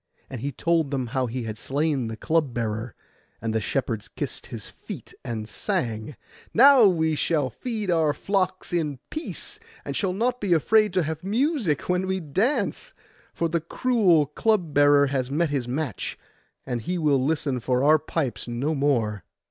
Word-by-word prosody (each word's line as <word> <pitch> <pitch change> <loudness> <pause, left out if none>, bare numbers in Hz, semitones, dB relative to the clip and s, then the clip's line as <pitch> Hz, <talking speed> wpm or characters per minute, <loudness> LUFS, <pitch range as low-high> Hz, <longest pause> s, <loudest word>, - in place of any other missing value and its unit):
And 125 -4 -5
he 140 - -2
told 165 +1 +1
them 135 -2 -1
how 130 -2 +1
he 120 +1 -4
had 110 -1 -5
slain 140 -2 0
the 110 0 -5
club 155 -4 0
bearer: 110 0 -3 0.4
and 110 0 -2
the 110 - +1
shepherds 115 -2 -2
kissed - - -5
his - - -7
feet - - -10
and 110 -2 -4
sang, 110 +3 -2 0.4
'Now 265 -1 +8
we 160 -4 +2
shall 150 -3 0
feed 215 - -3
our 160 -3 +3
flocks 185 +2 -1
in 155 -5 0
peace, 310 +1 -5 0.3
and - - -4 0.2
not 245 +3 0
be 195 -4 +2
afraid 215 +6 +4
to 185 -2 +2
have 160 +2 -4
music 220 - 0
when 180 +1 +1
we 190 0 0
dance; 220 - -1 0.4
for 170 - -1
the 170 0 -1
cruel 185 - +3
club 175 +2 0
bearer 145 0 +6
has 135 -2 -1
met 155 +2 0
his 135 -4 -1
match, 135 -1 -3 0.5
and 120 -2 -2
he 180 +11 -2
will 145 -5 +2
listen 140 -3 0
for 125 +2 0
our 155 +2 +6
pipes 145 -5 -3
no 125 +6 -1
more. 120 -8 0
150 Hz, 170 wpm, -25 LUFS, 130-180 Hz, 0.5 s, Now